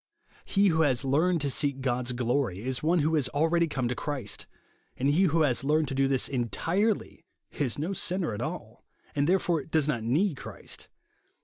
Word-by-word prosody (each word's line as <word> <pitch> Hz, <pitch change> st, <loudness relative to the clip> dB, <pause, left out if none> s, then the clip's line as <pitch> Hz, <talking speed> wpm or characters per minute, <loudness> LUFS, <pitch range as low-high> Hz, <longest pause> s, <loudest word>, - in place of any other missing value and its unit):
lie 200 Hz, -, +6 dB
who 160 Hz, -3 st, +3 dB
has 135 Hz, -3 st, +2 dB
learned 165 Hz, +6 st, +2 dB
to 145 Hz, -, -1 dB
seek 140 Hz, 0 st, 0 dB
God's 125 Hz, -1 st, -1 dB
glory 120 Hz, -5 st, -1 dB
is 130 Hz, 0 st, -2 dB
one 165 Hz, +3 st, +2 dB
who 160 Hz, 0 st, +1 dB
has 145 Hz, -5 st, +2 dB
already 165 Hz, +3 st, +2 dB
come 130 Hz, -5 st, -2 dB
to 120 Hz, -, -1 dB
Clirist; 145 Hz, +2 st, -4 dB, 0.5 s
and 135 Hz, +3 st, +2 dB
he 180 Hz, +6 st, +4 dB
who 165 Hz, -1 st, +2 dB
has 130 Hz, -3 st, +1 dB
learned 150 Hz, +1 st, +2 dB
to -, -, -3 dB
do 135 Hz, 0 st, +2 dB
this 135 Hz, -1 st, +3 dB
entirely, 165 Hz, -, -1 dB, 0.3 s
is 135 Hz, -5 st, -2 dB
no 160 Hz, +7 st, -2 dB
sinner 180 Hz, -, -1 dB
at 105 Hz, -, -5 dB
all; -, -, -6 dB, 0.3 s
and, 145 Hz, +2 st, +1 dB
therefore, 175 Hz, -5 st, +2 dB
does 155 Hz, -2 st, +1 dB
not 130 Hz, -7 st, 0 dB
need 150 Hz, -, +1 dB
Christ. -, -, -9 dB
145 Hz, 190 wpm, -28 LUFS, 130-165 Hz, 0.5 s, lie